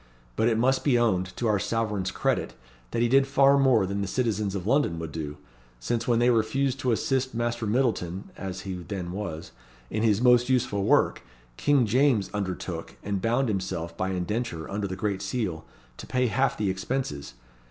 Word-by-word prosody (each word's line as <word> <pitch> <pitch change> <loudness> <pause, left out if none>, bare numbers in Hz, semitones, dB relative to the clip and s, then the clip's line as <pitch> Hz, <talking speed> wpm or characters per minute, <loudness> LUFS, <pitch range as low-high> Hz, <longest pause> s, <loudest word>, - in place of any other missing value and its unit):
But 110 - +2
it 115 -2 +2
must 130 +3 +2
be 135 -4 +3
owned, 95 -6 0
to 120 - -2
our 105 -3 +2
sovereign's 105 -4 -1
credit, - - -1 0.3
that 115 - 0
he - - +3
did 135 +2 +4
far 135 0 +5
more 130 -7 +4
than 100 +1 -2
the 100 - -2
citizens 105 -3 -1
of 95 -2 -4
London 130 - +2
would 80 -2 -5
do; 75 -2 -5 0.4
since 115 - -2
when 120 -2 +3
they 120 +1 +4
refused 130 +4 +1
to 130 -3 +1
assist 130 +2 0
Master 120 -1 -1
Myddleton 105 -6 0
(as 95 -1 -6
he 95 0 -5
then 90 0 -5
was) 90 -5 -5 0.4
in 110 - -1
his 110 -2 +3
most 125 0 +4
useful 115 -6 +1
work, - - +3 0.3
King 140 - +3
James 115 -4 +2
undertook, 95 -5 -4
and 100 -2 -2
bound 120 +5 +1
himself 95 -5 -3
by 95 - -2
indenture 95 -1 -3
under 100 0 -2
the 95 - -4
great 100 0 -2
seal, 95 -11 -3 0.3
to - - -9
pay 125 0 +1
half 135 +3 +1
the 100 -3 0
expenses. 95 - -4
110 Hz, 185 wpm, -26 LUFS, 95-125 Hz, 0.4 s, far